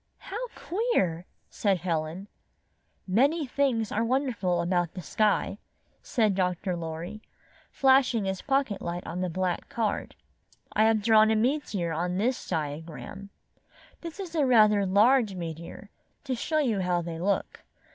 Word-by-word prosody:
"How 455 +6 -6
queer!" 195 - -1 0.2
said 200 -3 0
Helen. 170 +2 -2 0.8
"]Many 280 - +2
things 255 -5 0
are 225 - 0
wonderful 230 -8 0
about 175 -1 0
the 185 - -5
sky," 210 +2 +1 0.4
said 220 -6 +1
Dr. 180 0 -1
Loriy, 170 +5 -6 0.5
flashing 260 -5 +3
his 190 -1 -2
pocket 270 -7 0
light 175 +1 -4
on 175 +2 -4
the 185 - -1
black 180 +1 -2
card. 220 -3 -2 0.6
"I 215 - +4
have 220 -2 +3
drawn 220 0 +6
a 220 - +3
meteor 220 - 0
on 175 +3 -1
this 240 +5 -1
diagram. 160 +5 -5 0.7
This 335 +3 -8
is 365 -4 -6
rather 230 -9 +5
a 200 - +1
large 215 +2 +4
meteor, 170 +3 -7 0.3
to 270 -2 -2
show 310 +6 -1
you 245 -9 +1
how 180 -2 0
they 165 -1 -5
look. 195 +3 -1
205 Hz, 140 wpm, -27 LUFS, 175-255 Hz, 0.8 s, drawn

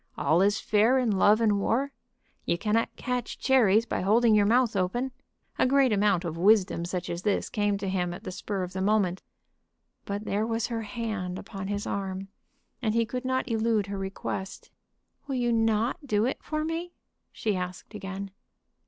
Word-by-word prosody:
All 165 +3 +3
is 205 +2 +3
fair 220 +5 +3
in 250 -4 +2
love 205 +3 +4
and 210 -3 +3
war. 265 +7 0 0.5
You 170 - 0
cannot 220 +4 0
catch 250 -2 -3
cherries 230 -5 +4
by - - -2
holding 220 +4 +4
your 205 -1 +4
mouth 235 0 +3
open. 220 +8 0 0.5
A - - +4
great 270 -3 +4
amount 200 -3 +2
of 165 -1 -4
wisdom 190 -3 +3
such 180 0 -3
as 170 0 -4
this 205 0 0
came 205 -1 +1
to 195 0 -4
him 180 -2 -1
at 185 +4 -8
the 185 - -5
spur 195 +1 -3
of 180 0 -6
the 190 - -3
moment. 195 -3 +1 0.8
But 205 +1 -4
there 210 +2 0
was 225 0 0
her 230 -2 -3
hand 215 -5 -4
upon 195 -1 -7
his 205 0 -2
arm, 195 -1 -4 0.5
and 220 -3 0
he 230 0 +3
could 250 +3 -5
not 260 0 0
elude 220 -2 +1
her 200 0 -5
request. 190 0 -5 0.6
"Will 270 - -2
you 240 -1 +1
not 225 +5 +1
do 210 -2 +2
it 260 - -2
for 310 0 -2
me?" 335 +2 -4 0.4
she 215 -3 -1
asked 180 +3 -5
again. 195 -1 -6
210 Hz, 185 wpm, -27 LUFS, 190-230 Hz, 0.8 s, love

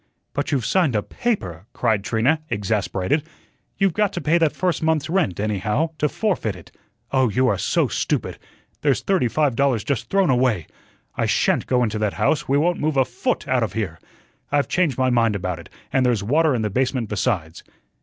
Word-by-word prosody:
"But - - -2
you've 130 -6 0
signed 170 - +2
a 105 - +1
PAPER," 100 - -3
cried 110 -5 +1
Trina, 125 +9 +1
exasperated. 100 +3 0 0.6
"You've 195 -2 +2
got 210 0 +1
to 175 - -2
pay 170 +1 +2
that 160 -3 +2
first 180 -2 0
month's 160 -1 0
rent, 175 - +1
anyhow 105 - 0
to 150 - +2
forfeit 175 - -1
it. 90 - -14 0.4
Oh, 130 -3 +3
you 125 +5 +2
are - - +2
so - - +1
stupid! - - -2 0.4
There's 140 -4 +2
thirty 190 -10 +1
five 145 0 +1
dollars 130 -4 +1
just 140 -5 -2
thrown 195 -6 +3
away. 125 -9 +2 0.5
I - - 0
SHAN'T - - +1
go 125 -1 +2
into 110 -2 -1
that 105 -2 0
house; 150 -1 0
we 140 - +3
won't 175 +4 +1
move 150 -2 0
a 130 - +4
FOOT 120 - -2
out 130 -1 +2
of 110 - -1
here. 95 -8 -3 0.5
I've 145 -3 +2
changed 170 -8 +1
my 130 -1 +2
mind 115 -3 +2
about 90 -3 -3
it, 85 - -12 0.2
and 130 - +3
there's 120 -5 +1
water 150 +5 +2
in 115 - -1
the 105 - -1
basement 125 0 0
besides." 95 -6 -2
125 Hz, 195 wpm, -22 LUFS, 105-155 Hz, 0.6 s, a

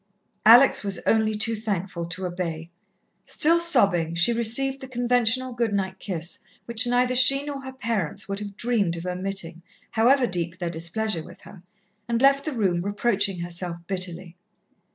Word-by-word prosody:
Alex 240 +3 +7
was 200 -3 0
only 220 -1 +1
too 220 +2 -1
thankful 195 -5 -4
to 175 +3 -4
obey. 170 -2 -5 0.5
Still 335 +3 +4
sobbing, 200 - +2
she 175 +8 +4
received 240 +4 +1
the 265 - -8
conventional 245 0 +1
good 235 -3 -2
night 190 -1 -3
kiss 170 -3 -3 0.3
which 235 +1 +3
neither 250 +1 +1
she 260 +2 +6
nor 285 -2 -6
her 265 0 -8
parents 220 - -3
would 195 0 -4
have 205 -1 -8
dreamed 210 -8 -1
of 165 - -8
omitting, 180 -2 -5 0.3
however 250 +4 +3
deep 175 -4 -3
their 175 -2 -4
displeasure 170 +2 -3
with - - -15
her, 190 - -14 0.5
and 235 -1 -1
left 275 +1 +3
the 310 - -3
room 190 -7 0
reproaching 200 -1 -1
herself 175 0 -5
bitterly. 180 -2 -4
205 Hz, 160 wpm, -24 LUFS, 175-245 Hz, 0.5 s, Alex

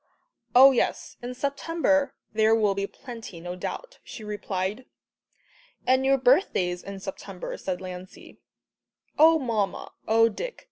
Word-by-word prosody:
"Oh, 265 +2 +10
yes, 255 - -1
in 245 +1 -6
September 285 +1 0 0.2
there 220 +1 +4
will 210 -3 +2
be 200 0 -2
plenty, 230 -8 -10
no 175 +1 -6
doubt," - - -6
she 220 - -9
replied. 205 +2 -3 1.0
"And 260 +1 +3
your 270 0 +4
birthday's 245 - +2
in 195 0 -8
September," 195 -1 -7
said 185 -1 -4
Lancey. 185 0 -10 0.8
"Oh, 320 +1 +7
Mamma, 225 -8 -2 0.2
oh, 225 +1 +5
Dick!" 475 - -5
225 Hz, 130 wpm, -26 LUFS, 195-265 Hz, 1.0 s, Oh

